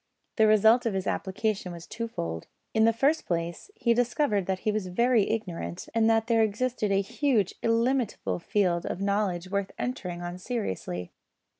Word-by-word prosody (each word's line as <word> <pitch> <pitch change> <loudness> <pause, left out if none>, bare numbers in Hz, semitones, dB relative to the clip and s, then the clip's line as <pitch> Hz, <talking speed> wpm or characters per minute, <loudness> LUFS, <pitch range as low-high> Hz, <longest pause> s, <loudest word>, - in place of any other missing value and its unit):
The 220 -1 +5
result 220 +3 +5
of 210 - -1
his 190 0 -2
application 195 -1 -2
was 170 0 -9
twofold. 85 - -5 0.3
In 220 0 +4
the 230 - +5
first 280 +8 +1
place 170 - -3
he 235 - +2
discovered 235 - +1
that 190 -1 -1
he 215 - +3
was 210 -3 -2
very 235 +3 +2
ignorant 185 -5 -4
and 225 0 +3
that 225 0 +3
there 230 -1 +3
existed 220 0 0
a 195 0 +3
huge 230 -1 +1
illimitable 230 -2 0
field 180 -2 0
of - - -3
knowledge 195 -3 -1
worth 200 -1 -1
entering 180 -9 -4
on 175 +1 -5
seriously. 95 - -4
210 Hz, 165 wpm, -28 LUFS, 185-230 Hz, 0.3 s, The